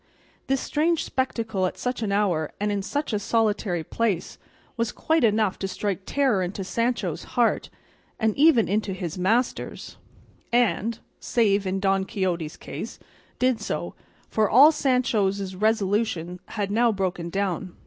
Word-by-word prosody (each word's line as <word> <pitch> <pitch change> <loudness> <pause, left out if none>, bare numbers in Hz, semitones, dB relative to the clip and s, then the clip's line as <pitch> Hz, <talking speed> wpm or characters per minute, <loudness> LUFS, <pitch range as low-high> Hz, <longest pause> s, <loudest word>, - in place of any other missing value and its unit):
This 270 0 +1
strange 325 +2 +1
spectacle 225 -7 -1
at - - -6
such 250 -1 -3
an 210 -3 -1
hour 185 -7 +1
and 210 0 0
in 200 -1 -1
such 285 +6 -3
a 210 - +1
solitary 210 -5 0
place 200 0 -2 0.4
was 230 -2 -1
quite 320 -3 +1
enough 215 -3 +2
to 195 - -2
strike 195 -1 -3
terror 265 -9 +2
into 185 +2 -3
Sancho's 230 -4 -1
heart, 235 -2 +2 0.5
and 220 -2 +1
even 285 -6 +5
into 205 0 0
his 180 -1 -5
master's; 225 +7 -1 0.5
and 235 -1 +2 0.2
(save 205 -4 +1
in 190 +1 -1
Don 195 0 +1
Quixote's 175 -5 -2
case) - - -7 0.4
did 255 -2 +1
so, - - -3 0.3
for 215 -2 +1
all 280 +7 +8
Sancho's 210 -9 +1
resolution 200 -4 0
had 205 -2 -3
now 235 +2 +3
broken 185 -4 -2
down. 185 -1 -2
210 Hz, 145 wpm, -25 LUFS, 190-235 Hz, 0.5 s, all